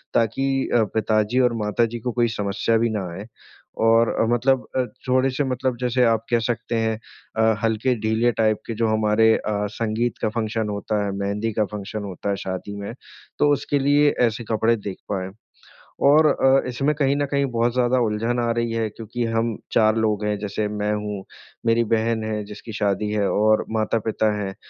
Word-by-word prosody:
ताकि 135 +4 +1
अ, 115 - +5
पिताजी 110 +2 +1
और 125 -2 +3
माताजी 115 +2 0
को 125 +2 -3
कोई 120 0 +2
समस्या 100 +3 +1
भी 115 +1 +1
ना 105 -3 -2
आए। 100 +4 -7 0.6
और 115 0 +5
अ, - - +3
मतलब 125 +2 +1
अ, 130 - +3 0.3
थोड़े 130 +1 +3
से 135 +3 -1
मतलब 130 -1 -1
जैसे 125 0 +2
आप 115 -1 +1
कह 120 - +4
सकते 120 0 -4
हैं 110 -1 0 0.4
अ, 110 -1 +3
हल्के 115 +3 +1
ढीले 110 +2 +2
टाइप 110 -1 +2
के 115 - -3
जो 115 +1 +1
हमारे 110 +1 +3
अ, 110 - -3 0.3
संगीत 115 +1 -1
का - - +1
फ़ंक्शन 110 -1 -2
होता 105 +1 -2
है, 100 - -2
मेहंदी 105 +3 -1
का 105 0 +1
फ़ंक्शन 105 +1 -5
होता 100 0 -5
है 100 - +1
शादी 95 +2 -4
में 100 +3 -5 0.5
तो 145 - +4
उसके 145 0 0
लिए 145 +2 +4 0.2
ऐसे 115 +2 -4
कपड़े 110 +1 +3
देख 100 -2 -6
पाएंँ। 95 -2 -3 0.8
और 150 +2 +6
अ, 135 -2 +3
इसमें 140 +4 0
कहीं 140 -1 +1
न 145 - +1
कहीं 140 -1 +2
बहुत 120 0 +1
ज़्यादा 125 0 +2
उलझन 115 +2 0
आ 120 -1 +1
रही 115 0 0
है 115 -1 -1
क्योंकि 115 +3 -5
हम 115 0 0 0.2
4 110 -1 +4
लोग 110 -2 0
हैं 105 0 0
जैसे 105 +1 -2
मैं 105 0 -2
हूँ, 105 -2 -4 0.4
मेरी 115 0 +3
बहन 110 0 0
है 110 -1 -2
जिसकी 105 +2 -10
शादी 105 -1 0
है 105 -2 +1
और 110 +1 +3
माता-पिता 110 0 0
हैं। 95 -2 -4
110 Hz, 190 wpm, -23 LUFS, 105-120 Hz, 0.8 s, और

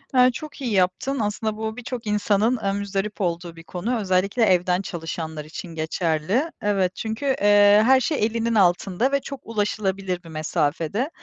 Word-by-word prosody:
Eee, 250 0 +7
çok 305 +1 -8
iyi 240 -4 -2
yaptın 190 +9 +1
aslında 215 +1 -2
bu 220 +1 -4
birçok 245 -2 -6
insanın 210 +3 +2
aaa, 195 -2 -1
muzdarip 200 +1 -3
olduğu 170 -1 -2
bir 165 - -12
konu. 215 +9 -3
Özellikle 195 +4 +1
evden 180 -1 +3
çalışanlar 160 -3 -5
için 165 +1 -8
geçerli. 165 - 0
Evet, 195 -3 +1
çünkü, 220 +5 -4
eee, 205 -5 +5
her 265 +1 +6
şey 260 -3 0
elinin 230 0 -1
altında 190 +6 +2
ve 280 - +2
çok 275 0 -7
ulaşılabilir 195 -4 -2
bir 165 - -12
mesafede. 160 - -1
205 Hz, 160 wpm, -23 LUFS, 180-230 Hz, -, Eee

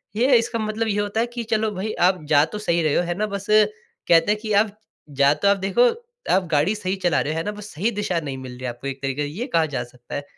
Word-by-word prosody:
ये 250 +4 +4
इसका 230 0 -1
मतलब 215 +1 -2
ये 205 -1 0
होता 205 +2 -2
है 230 - +2
कि 240 -1 -3
चलो 220 -1 +1
भई, 205 +3 -3
आप 180 -2 +2
जा 145 -1 +6
तो 210 - -7
सही 170 -5 +1
रहे 155 - +1
हो। - - +3
है 175 0 -2
ना? 215 - 0
बस 200 -1 -5
कहते 215 - +2
हैं 210 - 0
कि 215 -1 -4
आप 210 -1 -4 0.4
जा 140 +1 +6
तो 200 - -1
आप 200 0 +4
देखो, 195 +6 +2 0.5
आप 190 0 +3
गाड़ी 155 +8 +2
सही 190 -2 -2
चला 175 -4 +2
रहे 155 - -2
हो, - - -4
है 165 - -1
ना? 210 - -1
बस 210 0 -10
सही 200 +10 0
दिशा 200 -5 -1
नहीं 140 -4 -5
मिल 130 -1 -8
रही 125 +1 -11
है 125 - -2
आपको 120 +3 -7
एक 135 0 -5
तरीके 135 +1 -2
से, 145 - -1
ये 205 - -5
कहा 165 - +4
जा 120 - -1
सकता 120 0 -11
है 145 - -3
195 Hz, 290 wpm, -22 LUFS, 150-215 Hz, 0.5 s, जा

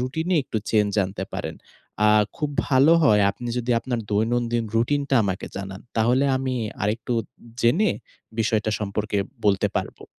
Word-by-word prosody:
রুটিনে 160 +8 -1
একটু 110 - -3
চেঞ্জ 105 -2 +3
আনতে 95 +1 -5
পারেন। - - -4 0.5
আ - - +6 0.3
খুব 150 -3 -2 0.2
ভালো 140 +4 +5
হয় 105 -7 +5
আপনি 120 +4 -7
যদি 125 +1 -2
আপনার 120 -2 -2
দৈনন্দিন 115 +2 +1
রুটিনটা 140 +4 +1
আমাকে 95 -1 -3
জানান। 95 0 -6 0.2
তাহলে 125 +5 +3
আমি 130 -1 -2 0.3
আরেকটু 110 +4 -1 0.5
জেনে 165 - +3 0.5
বিষয়টা 110 0 +1
সম্পর্কে 105 0 -2 0.3
বলতে 100 -2 +3
পারবো। - - -7
115 Hz, 140 wpm, -24 LUFS, 105-130 Hz, 0.5 s, আ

